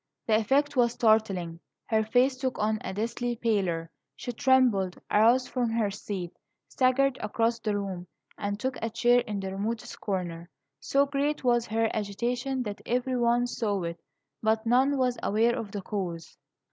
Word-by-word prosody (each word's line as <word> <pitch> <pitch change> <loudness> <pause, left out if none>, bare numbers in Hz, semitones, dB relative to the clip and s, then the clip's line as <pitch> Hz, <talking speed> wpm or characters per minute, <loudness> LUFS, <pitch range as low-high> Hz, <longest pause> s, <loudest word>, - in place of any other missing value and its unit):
The 220 - +3
effect 280 +6 +1
was 240 -2 +3
startling. 200 -8 +1 0.3
Her 220 -1 +1
face 250 +4 +3
took 260 -1 -3
on 215 +1 0
a - - -4
deathly 235 +4 -2
pallor; 185 -8 -1 0.2
she 245 - -5
trembled, 240 -8 +2
arose 235 +4 +4
from 245 -3 -1
her 225 -3 0
seat, 195 -4 -5 0.4
staggered 265 0 +2
across 230 +2 0
the 215 -2 -1
room, 190 -3 -5 0.3
and 205 0 -3
took 260 +2 -2
a 225 - -1
chair 240 +2 +4
in 210 -4 -3
the 190 0 -4
remotest 215 +4 -4
corner. 175 -4 -3 0.3
So 280 +1 +2
great 285 +1 -1
was 240 -2 +2
her 225 +1 +1
agitation 240 +5 -2
that 205 -2 -6
every 250 +2 -1
one 240 0 +2
saw 210 -6 -2
it, 170 0 -4 0.4
but 220 +1 +1
none 260 +4 +3
was 250 -2 +1
aware 225 +3 +2
of 210 -3 -5
the 200 -1 -5
cause. 180 -6 -5
225 Hz, 165 wpm, -28 LUFS, 205-250 Hz, 0.4 s, arose